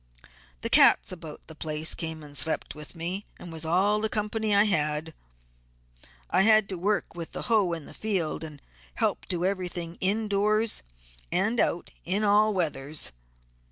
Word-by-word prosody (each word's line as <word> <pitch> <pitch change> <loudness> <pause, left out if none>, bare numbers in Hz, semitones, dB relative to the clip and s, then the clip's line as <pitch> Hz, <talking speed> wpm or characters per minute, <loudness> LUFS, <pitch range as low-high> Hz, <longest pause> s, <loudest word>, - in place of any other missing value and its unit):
The - - +1
cats - - +6
about 165 -4 -9
the 160 - -11
place 155 0 +1
came 160 -1 -5
and 145 -1 -12
slept 160 +3 0
with 150 +3 -9
me, 180 +5 -5
and 170 - -10
was 160 0 -5
all 195 +6 +2
the 220 - 0
company 210 0 0
I 205 - +6
had. 155 -5 0 1.2
I - - +4
had 215 0 +5
to 190 - -2
work 200 +4 -1
with 170 -1 -8
the - - -4
hoe 210 -7 +2
in 165 -3 -6
the - - -12
field 185 -8 -1
and 150 -3 -9 0.3
help - - -1
do 175 -1 -1
everything 180 -3 -3
in 210 +4 +2
doors 210 +2 +2 0.5
and 220 +6 +2
out 170 - 0
in 195 +5 -1
all 210 +1 +4
weathers. 150 - -1
180 Hz, 165 wpm, -27 LUFS, 160-210 Hz, 1.2 s, cats